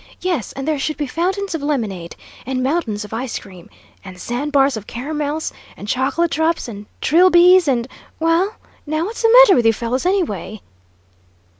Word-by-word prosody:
Yes, 350 - -2
and 270 +1 -6
there 310 -2 0
should 310 +2 -2
be 295 - -2
fountains 375 +7 -2
of 325 - -3
lemonade! 215 - -3 0.3
And 255 0 -2
mountains 255 -8 -1
of 210 - -11
ice 240 +2 -3
cream! 185 -4 -13 0.3
And 185 -2 -11
sandbars 275 +4 0
of 210 -2 -8
caramels, 295 +4 -4 0.2
and 205 - -9
chocolate 270 +8 0
drops, 320 -1 0
and 210 -2 -9
trilbies, 355 +1 +5
and 245 -3 0 0.3
well, 330 +6 +1 0.3
now, 310 +2 -1
what's 445 +4 -6
the 455 - +4
matter 455 -6 +7
with 240 - +2
you 225 - +5
fellows, 245 +8 -2
anyway?" 215 - -2
285 Hz, 165 wpm, -19 LUFS, 230-335 Hz, 0.3 s, matter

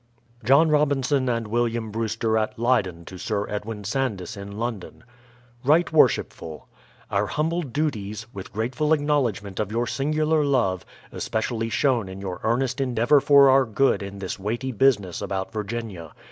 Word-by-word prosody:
John 140 +8 +5
Robinson 140 -3 +2
and 115 -1 -1
JVilliatn 115 0 -1
Brewster 110 0 -1
at 110 -1 -1
Lcyden 100 -8 0
to 95 +1 -10
Sir 105 0 -2
Edwin 105 0 -5
Sandys 105 -5 -2
in 100 0 -8
London: 115 -4 -5 0.6
Right 160 +5 +3
Worshipful, 80 - +1 0.4
Our 100 0 +1
humble 165 - -1
duties, 115 - -3
with 95 -2 -8
grateful 125 +9 0
acknowledgment 125 -11 0
of 105 -1 -2
your 120 +2 0
singu 155 +5 -1
lar 155 -1 +3
love, 120 -10 +1 0.3
especially 115 0 -2
shown 120 -5 +1
in 95 +1 -8
your 95 -2 -5
earnest 125 +3 0
endeavour 125 +2 +3
for 140 -1 +6
our 135 0 +5
good 130 +2 +1
in 100 0 -7
this 100 0 -5
weighty 115 +7 -3
business 105 -7 +1
about 95 -1 -4
Virginia. 105 -6 -5
115 Hz, 150 wpm, -24 LUFS, 100-135 Hz, 0.6 s, for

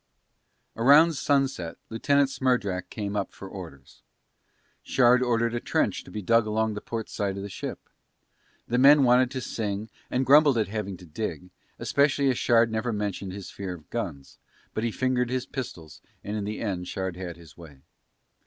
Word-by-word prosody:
About 145 +8 +6
sunset 135 - 0
Lieutenant 140 +4 +2
Smerdrak 100 -10 0
came 100 -1 -4
up 100 - -2
for 95 - -10
orders. 80 -9 -11 0.8
Shard 125 -1 +4
ordered 115 -2 +1
a 120 - -1
trench - - 0
to - - -14
be 105 - -6
dug 115 +2 +3
along 110 0 0
the 105 - -6
port 115 -2 -5
side 100 -1 -3
of 100 - -5
the 100 - -6
ship. - - -5 0.9
The 125 +1 +1
men 140 +2 +7
wanted 125 0 +5
to 130 0 -4
sing 105 -2 -4 0.2
and 130 +1 0
grumbled 145 0 +6
at 110 -4 0
having 100 -3 -4
to 90 - -13
dig, 90 0 -5 0.3
especially 140 -1 +2
as 125 - -2
Shard 115 -1 +4
never 110 +2 -1
mentioned 100 -3 -3
his 100 -1 -8
fear 95 -3 -5
of 80 -3 -17
guns, 85 -13 -5 0.3
but 110 - -2
he 115 - +1
fingered 125 +1 0
his 130 0 -2
pistols 80 - -7 0.2
and 105 - -4
in 105 -2 -2
the 105 +1 -4
end 95 -5 -3
Shard 95 -2 -3
had 90 -2 -6
his 80 -5 -15
way. 75 -6 -14
110 Hz, 180 wpm, -26 LUFS, 95-125 Hz, 0.9 s, men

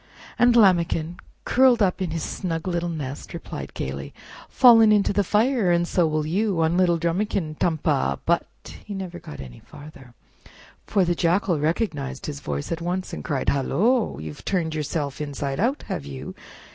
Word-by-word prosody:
And 245 -1 +5
Lambikin, 175 -5 +3 0.3
curled 255 -1 +4
up 195 -2 +1
in 185 - -1
his 160 0 -3
snug 165 -2 -4
little 175 -1 -1
nest, 145 -5 -6
replied - - -7
gayly: 70 +1 -5 0.3
"Fallen 225 -3 +7
into 205 -1 +3
the 205 +1 +2
fire, 215 +1 +2
and 175 0 +2
so 175 -2 +2
will 155 -1 -1
you 190 +3 0
On 160 +2 +1
little 175 -2 +3
Drumikin! 170 -1 -2
Tum 165 -2 +1
pa—" 145 -3 0
But 170 0 +1 0.4
he 205 - -7
never 180 -2 -6
got 70 - -10
any 65 -3 -10
further, 135 -5 -14 0.7
for 195 -4 +2
the 175 - +1
Jackal 175 0 +1
recognized 150 - -2
his 145 -2 -5
voice 70 - -4
at 165 0 -3
once, 180 +2 -3
arid - - -6
cried: 140 -5 0
"Hullo! 210 - +1
you've 75 -1 -8
turned 170 -5 -1
yourself 150 -1 -3
inside 140 -1 -4
out, 255 +8 0
have - - -4
you? 70 -2 -7
170 Hz, 170 wpm, -24 LUFS, 150-195 Hz, 0.7 s, Fallen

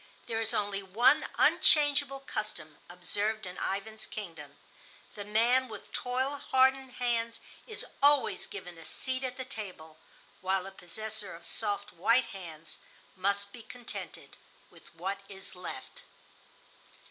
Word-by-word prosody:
There 225 -1 -1
is 225 - +2
only 200 -1 0
one 225 +9 +4
unchangeable 285 -2 +6
custom 210 - -5
observed 205 +5 -1
in 180 0 -7
Ivan's 215 +3 -2
kingdom: 165 -9 -8 0.6
The 205 - -6
man 235 +5 +4
with 220 - -10
toil 260 +3 -1
hardened 265 0 +3
hands 230 -2 0 0.3
is 435 -3 -3 0.2
always 285 -3 +4
given 180 -4 -8
a 165 - -11
seat 260 0 -1
at 255 -1 -3
the 260 - -4
table, 185 -11 -7 0.4
while 190 0 +1
the 195 - -8
possessor 210 +2 -3
of 170 0 -12
soft 205 -2 0
white 230 +8 +3
hands 165 -4 -9 0.4
must 200 +1 0
be 240 - -9
contented 240 +2 -7 0.3
with - - -17
what 190 +4 -3
is 195 -1 -5
left. 180 -1 -8
215 Hz, 135 wpm, -31 LUFS, 190-250 Hz, 0.6 s, unchangeable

